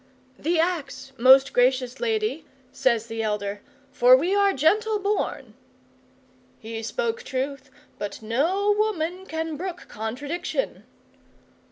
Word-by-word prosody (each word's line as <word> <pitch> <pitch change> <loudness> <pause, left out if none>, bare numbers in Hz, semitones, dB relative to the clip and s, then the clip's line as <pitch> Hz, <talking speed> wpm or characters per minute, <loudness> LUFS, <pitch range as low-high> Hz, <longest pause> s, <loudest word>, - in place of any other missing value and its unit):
'"The 330 +2 0
axe, 300 -6 -2
most 265 +2 +6
gracious 250 0 +2
lady," 440 -2 -1 0.3
says 235 -4 +1
the 225 -1 -4
elder, 210 -2 -2 0.3
"for 255 -2 +6
we 345 +8 0
are 400 0 +4
gentle 425 - +2
born." 410 +1 -2 1.0
He 225 0 -7
spoke 470 - -2
truth, 275 - -4 0.3
but 205 - -5
no 330 - +1
woman 380 -4 -1
can 320 -1 -3
brook 360 +2 -6
contradiction. 285 - -4
290 Hz, 115 wpm, -25 LUFS, 250-395 Hz, 1.0 s, most